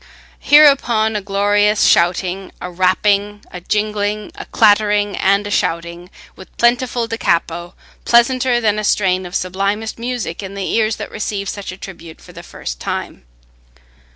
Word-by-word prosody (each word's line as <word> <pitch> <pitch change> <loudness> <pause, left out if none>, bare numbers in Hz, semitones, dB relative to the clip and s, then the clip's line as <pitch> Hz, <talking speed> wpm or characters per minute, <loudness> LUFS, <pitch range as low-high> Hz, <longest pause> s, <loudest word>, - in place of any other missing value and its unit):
Hereupon 255 -7 +4
a 210 - -1
glorious 205 +1 +1
shouting, 185 +2 +1
a 180 - -7
rapping, 200 +3 0
a 180 - -8
jingling, 210 +1 -2
a - - -9
clattering, 205 -1 +2
and 200 +1 +1
a 205 - -5
shouting, 170 0 -2 0.3
with 190 - -15
plentiful 240 0 +1
da 225 0 -5
capo, 170 -2 -1 0.3
pleasanter 240 +1 +3
than 215 -2 +1
a - - -3
strain 185 -3 +1
of 175 - -9
sublimest 200 +5 -2
music 235 -8 -4
in 195 0 -8
the 195 -1 -4
ears 220 -1 +1
that - - -8
receive 205 -2 -4
such 200 -2 -6
a 185 - -10
tribute 170 -4 -11
for - - -16
the - - -10
first - - -8
time. - - -5
205 Hz, 155 wpm, -17 LUFS, 185-220 Hz, 0.3 s, Hereupon